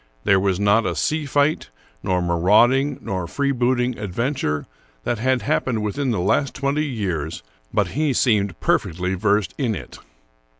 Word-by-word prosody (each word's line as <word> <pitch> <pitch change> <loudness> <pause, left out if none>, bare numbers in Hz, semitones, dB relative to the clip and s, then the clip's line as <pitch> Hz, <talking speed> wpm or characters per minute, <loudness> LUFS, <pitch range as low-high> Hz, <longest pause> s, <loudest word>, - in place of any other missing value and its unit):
There 100 -1 +4
was 95 -1 0
not 105 +2 +3
a 85 - -2
sea 150 - -1
fight, 145 +2 +1 0.3
nor 90 -1 0
marauding 115 - +3
nor 95 -6 -3
freebooting 125 -1 0
adventure 105 - -2 0.4
that 120 - -1
had 130 +1 +1
happened 115 -4 0
within 130 +6 -1
the 110 -6 0
last 125 +9 +1
twenty 140 +3 0
years, 90 - -3 0.3
but - - +1
he 150 +1 0
seemed 105 - +1
perfectly 90 +3 0
versed 100 +1 +1
in 120 -6 0
it. - - -9
110 Hz, 145 wpm, -22 LUFS, 95-130 Hz, 0.4 s, There